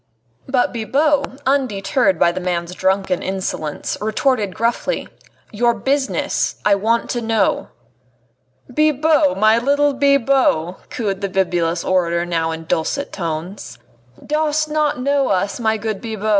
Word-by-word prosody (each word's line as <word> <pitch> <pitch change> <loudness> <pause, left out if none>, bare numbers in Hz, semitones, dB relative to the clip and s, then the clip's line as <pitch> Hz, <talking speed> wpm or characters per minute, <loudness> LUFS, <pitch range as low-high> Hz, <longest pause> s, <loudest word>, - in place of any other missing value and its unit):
But 260 -1 +1
Bibot, 280 +4 0
undeterred 215 -6 +1
by 170 - +4
the 175 - -4
man's 175 -1 -2
drunken 190 -1 0
insolence, 185 -5 -3
retorted 215 -2 0
gruffly: 235 - -1 0.4
"Your 235 +2 +2
business, 270 +5 -1
I 210 - +5
want 225 +4 +1
to 240 - -2
know." 225 -1 +1 1.0
"Bibot! 305 +1 +2
my 215 +3 +4
little 285 +3 +2
Bibot!" 270 - +1
cooed 200 -5 -3
the 200 - -2
bibulous 175 -3 0
orator 170 -2 +1
now 165 -2 -1
in 165 0 -5
dulcet 160 - -2
tones, 170 +1 -5 0.5
"dost 305 0 0
not 300 -2 +1
know 280 +1 +1
us, 195 +3 0
my 220 -1 +1
good 215 -2 -4
Bibot? 220 -2 -4
220 Hz, 130 wpm, -19 LUFS, 185-275 Hz, 1.0 s, I